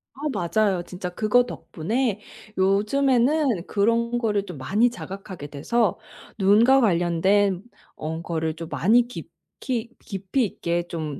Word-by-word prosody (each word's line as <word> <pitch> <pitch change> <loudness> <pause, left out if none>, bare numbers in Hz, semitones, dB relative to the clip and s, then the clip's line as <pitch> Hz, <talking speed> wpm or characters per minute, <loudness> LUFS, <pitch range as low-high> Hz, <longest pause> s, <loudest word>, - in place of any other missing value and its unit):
아 - - -16
맞아요. 195 -1 0
진짜 180 0 -6
그거 215 +6 +3
덕분에 215 +4 -2 0.4
요즘에는 245 - +2
그런 230 +3 +1
거를 210 -4 0
좀 180 -6 -8
많이 210 - +2
자각하게 195 -8 -8
돼서 190 +9 0 0.4
눈과 225 +7 +5
관련된 185 +1 +2 0.3
어 160 +2 -5
거를 160 -2 -2
좀 165 0 -8
많이 235 +6 +3
깊이 245 -1 -6
깊이 195 +6 -2
있게 170 -3 -2
좀 155 -5 -5
200 Hz, 245 characters per minute, -24 LUFS, 175-235 Hz, 0.4 s, 눈과